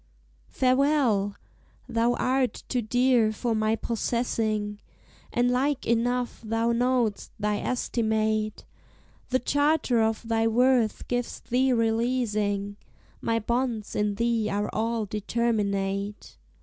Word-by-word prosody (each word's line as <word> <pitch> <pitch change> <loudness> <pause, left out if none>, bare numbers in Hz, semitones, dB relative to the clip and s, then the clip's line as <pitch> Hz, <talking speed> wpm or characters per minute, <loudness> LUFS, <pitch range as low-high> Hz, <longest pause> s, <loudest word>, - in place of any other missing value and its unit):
Farewell! 255 -6 +2 0.5
thou 230 +1 +1
art 255 0 0
too 250 - 0
dear 245 0 +3
for 230 +2 -2
my 215 0 +1
possessing, 220 -3 -1 0.5
And 245 +1 +2
like 270 +2 0
enough 240 +1 0
thou 225 +1 0
know'st 240 -3 0
thy 210 0 0
estimate: 220 -3 -1 0.6
The 255 - +3
charter 285 -2 +2
of 220 +1 -1
thy 225 0 +2
worth 240 -1 +2
gives 245 -1 -2
thee 255 +2 +1
releasing; 225 -4 0 0.4
My 230 - 0
bonds 235 -1 -2
in 210 -1 0
thee 230 -1 0
are 205 +1 -1
all 225 0 -1
determinate. 205 -2 -2
230 Hz, 110 wpm, -26 LUFS, 215-245 Hz, 0.6 s, dear